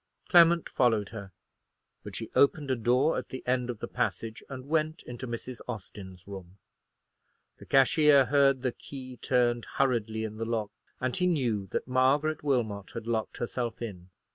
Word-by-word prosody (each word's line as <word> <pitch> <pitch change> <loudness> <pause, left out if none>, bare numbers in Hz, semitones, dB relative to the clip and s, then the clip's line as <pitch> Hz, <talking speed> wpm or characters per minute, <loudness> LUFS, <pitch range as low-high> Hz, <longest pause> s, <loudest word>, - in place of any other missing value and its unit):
Clement 170 -1 +6
followed 110 -5 +1
her; 100 -3 -8 0.7
but - - -9
she - - -6
opened 140 0 +3
a - - +2
door 125 +6 +2
at - - -9
the 130 - -7
end 125 0 0
of 120 - -3
the - - -5
passage, 115 0 -3
and 130 -2 -7
went 155 +1 0
into 125 +1 -7
Mrs. 120 +1 -6
Austin's 95 -5 -8
room. 95 -2 -9 1.0
The - - -13
cashier 140 +1 +5
heard 135 -2 +3
the 130 - +1
key 130 0 -10
turned 120 -1 +1
hurriedly 115 -5 +1
in 110 -1 -5
the 115 - -3
lock, 110 -3 -2 0.3
and 130 0 -1
he 180 - +1
knew 120 - 0
that - - -3
Margaret 140 +5 +2
Wilmot 115 -8 -1
had - - -5
locked 115 -2 -2
herself 120 -1 -3
in. 95 -6 -7
125 Hz, 165 wpm, -29 LUFS, 110-135 Hz, 1.0 s, Clement